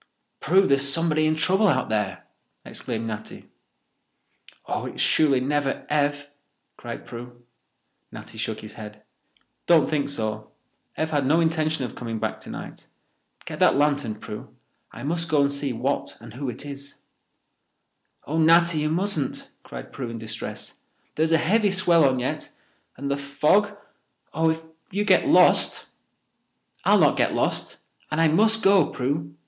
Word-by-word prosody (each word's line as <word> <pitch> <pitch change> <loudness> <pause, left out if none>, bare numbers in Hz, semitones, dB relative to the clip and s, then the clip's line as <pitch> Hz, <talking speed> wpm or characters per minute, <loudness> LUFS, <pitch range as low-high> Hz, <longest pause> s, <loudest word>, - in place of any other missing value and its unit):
"Prue, 190 +4 +3
there's 140 -3 +4
somebody 155 0 +2
in 155 - +1
trouble 190 +7 +2
out 130 -8 +1
there!" 100 -5 -2 0.4
exclaimed 115 -2 -5
Natty. 110 -1 -7 1.1
"Oh, - - -3
it's - - -8
surely 145 -4 +3
never 140 +1 -1
Ev!" 145 -1 0 0.4
cried - - -8
Prue. 120 +1 -10 0.7
Natty - - -10
shook - - -3
his - - -9
head. 105 0 -10 0.6
"Don't 165 -3 +5
think 145 -2 -1
so. 110 -6 -3 0.5
Ev 160 0 -1
had 145 -3 +1
no 160 +4 +4
intention 160 -3 0
of 120 - -7
coming 115 -2 -5
back - - -3
tonight. - - -9 0.6
Get - - -7
that - - +5
lantern, 145 -5 +1
Prue. 105 0 -9 0.4
I - - -10
must 165 +3 -2
go 150 -2 +3
and 140 0 +2
see 140 -1 -2
what 130 +4 -2
and 115 -1 -12
who 135 +1 -4
it 125 +4 -7
is." 140 0 -9 1.3
"Oh, 160 +3 -2
Natty, 165 0 +4
you 150 0 0
mustn't," 165 -4 -1
cried - - -10
Prue 130 -4 -5
in 115 - -6
distress. 110 0 -7 0.3
"There's 160 +1 0
a 165 - +5
heavy 205 +6 +2
swell 175 -4 +3
on 130 - -1
yet—and 130 +2 -6
the 140 - 0
fog—oh, 160 +2 -1
if 160 0 -2 0.3
you 205 +2 -1
get - - +4
lost—" - - +4 1.0
"I'll - - +5
not - - +4
get - - +1
lost, - - -1 0.3
and 155 - -2
I 165 -1 +4
must 220 +7 +2
go, 195 -5 +5
Prue. 150 +4 -3
145 Hz, 150 wpm, -24 LUFS, 130-165 Hz, 1.3 s, Don't